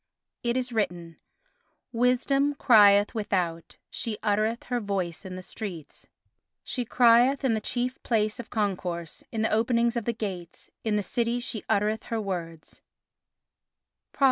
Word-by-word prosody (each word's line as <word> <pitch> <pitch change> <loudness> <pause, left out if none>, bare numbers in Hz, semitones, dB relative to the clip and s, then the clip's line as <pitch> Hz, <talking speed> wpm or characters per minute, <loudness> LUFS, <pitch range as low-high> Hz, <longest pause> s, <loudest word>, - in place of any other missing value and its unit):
It 240 +1 0
is 250 -1 -2
written: 175 -6 -2 0.7
"Wisdom 260 +4 +2
crieth 205 -5 +6
without; 180 -7 -2
she 220 -3 -4
uttereth 215 +2 +1
her 245 -1 -2
voice 195 -6 -3
in 185 -1 -6
the 185 - -7
streets: 180 -8 -8 0.6
"She 250 -2 -3
crieth 245 +3 +4
in 260 -4 +2
the 220 - -1
chief 250 +3 -2
place 215 -2 0
of 235 - -7
concourse, 180 -6 -3
in 220 -1 -1
the 220 - +1
openings 235 +1 +2
of 235 -3 -2
the 235 - 0
gates: 185 -6 -6
in 220 -2 0
the 210 - 0
city 235 +3 -1
she 240 -3 -4
uttereth 210 +2 +1
her 230 - -2
words" 170 -6 -6 1.3
(Prov. - - -25
220 Hz, 145 wpm, -27 LUFS, 195-240 Hz, 1.3 s, crieth